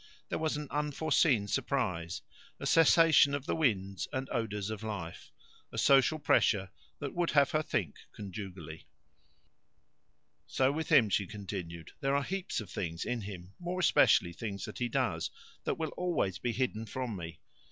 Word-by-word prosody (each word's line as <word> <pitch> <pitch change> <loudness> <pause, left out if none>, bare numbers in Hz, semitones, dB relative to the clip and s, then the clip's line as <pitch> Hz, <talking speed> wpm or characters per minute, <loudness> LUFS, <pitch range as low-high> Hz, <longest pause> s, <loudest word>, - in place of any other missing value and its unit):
There - - -2
was 155 -1 0
an 150 -1 -5
unforeseen 150 -5 +2
surprise, 90 - -1 0.4
a - - -5
cessation 160 -3 +6
of 140 -1 -5
the - - -1
winds 100 - 0
and 130 0 -3
odours 105 -3 -2
of 110 -1 -5
life, 100 -7 -6 0.4
a - - -8
social 140 +2 +5
pressure 100 - +2 0.3
that 145 - -5
would 175 -1 0
have 140 -2 +4
her 155 - +2
think 105 - -2
conjugally. 95 -5 -8 1.6
"So 130 0 +2
with 160 +2 -3
him," 110 -5 +6
she 100 -1 +1
continued. 95 -6 -7
"There 135 0 +1
are 140 - +1
heaps 190 +4 -3
of 105 -5 -8
things 85 -3 -3
in 125 -1 -2
him 95 -2 -8
more 175 +1 -3
especially 85 - +4
things 100 -1 -5
that - - -8
he 120 -1 0
does - - 0 0.4
that - - -1
will 160 -2 -2
always 170 - -1
be 120 - -1
hidden 115 -3 -2
from 125 -3 -4
me. 85 -2 -7
115 Hz, 165 wpm, -31 LUFS, 95-145 Hz, 1.6 s, cessation